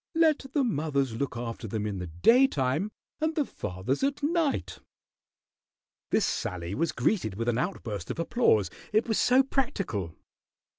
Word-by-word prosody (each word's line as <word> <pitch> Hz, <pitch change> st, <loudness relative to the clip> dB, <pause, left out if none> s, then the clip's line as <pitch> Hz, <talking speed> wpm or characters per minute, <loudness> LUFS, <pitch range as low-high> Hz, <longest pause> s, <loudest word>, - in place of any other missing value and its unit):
"Let 315 Hz, -4 st, +3 dB
the 285 Hz, -, +4 dB
mothers 145 Hz, -, 0 dB
look 125 Hz, 0 st, -3 dB
after 115 Hz, -1 st, -5 dB
them 105 Hz, 0 st, -2 dB
in 100 Hz, -3 st, -3 dB
the 90 Hz, -, -4 dB
daytime, 155 Hz, -, +3 dB, 0.3 s
and 315 Hz, 0 st, 0 dB
the 300 Hz, -, +1 dB
fathers 95 Hz, -, -3 dB
at 285 Hz, +1 st, 0 dB
night." 320 Hz, -1 st, 0 dB, 1.3 s
This 215 Hz, -, +3 dB
sally 90 Hz, -5 st, -3 dB
was 165 Hz, +9 st, 0 dB
greeted 140 Hz, -, 0 dB
with 115 Hz, +3 st, -3 dB
an 120 Hz, 0 st, +1 dB
outburst 110 Hz, -, -3 dB
of -, -, -3 dB
applause, 165 Hz, -, +2 dB, 0.2 s
it 215 Hz, +3 st, +2 dB
was 220 Hz, -, +1 dB
so 255 Hz, +2 st, +5 dB
practical. 200 Hz, -, -2 dB
145 Hz, 150 wpm, -28 LUFS, -, 1.3 s, so